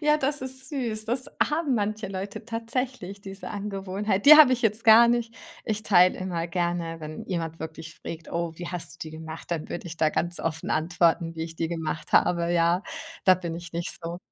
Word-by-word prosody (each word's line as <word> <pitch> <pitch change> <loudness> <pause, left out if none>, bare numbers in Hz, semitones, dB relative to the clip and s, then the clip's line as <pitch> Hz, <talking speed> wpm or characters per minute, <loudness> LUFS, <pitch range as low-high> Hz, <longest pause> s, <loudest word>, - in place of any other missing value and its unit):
Ja, 300 -1 +4
das 290 0 -1
ist 260 0 -7
süß. 235 -7 -2
Das 245 +3 0 0.2
haben 300 -3 0
manche 210 -1 -2
Leute 195 +3 -6
tatsächlich, 230 -3 -4
diese 195 0 -8
Angewohnheit. 200 0 -2
Die 305 +1 +12
habe 295 -4 +8
ich 245 - 0
jetzt 220 +1 +1
gar 230 +1 +8
nicht. 235 -1 0 0.3
Ich 215 -1 -2
teile 185 -3 +5
immer 175 -3 -3
gerne, 170 -1 -2
wenn 155 0 -7
jemand 165 -3 -3
wirklich 160 0 -7
frägt: 165 0 -8
„Oh, 170 -1 -2
wie 175 0 -6
hast 175 -1 -5
du - - -36
die - - -11
gemacht?“ 160 +1 -9
Dann 165 -3 -3
würde 175 - -6
ich 170 -1 -7
da 155 -1 +3
ganz 175 +2 0
offen 160 -1 -3
antworten, 165 +1 +1
wie 160 - -4
ich 165 0 -9
die 165 - -1
gemacht 160 -2 -4
habe. 170 -1 +3
Ja, 170 +2 +2 0.4
da 185 - +7
bin 170 -2 -5
ich 170 0 -8
nicht 170 0 -4
so. 170 +1 -5
185 Hz, 205 wpm, -26 LUFS, 165-225 Hz, 0.4 s, Die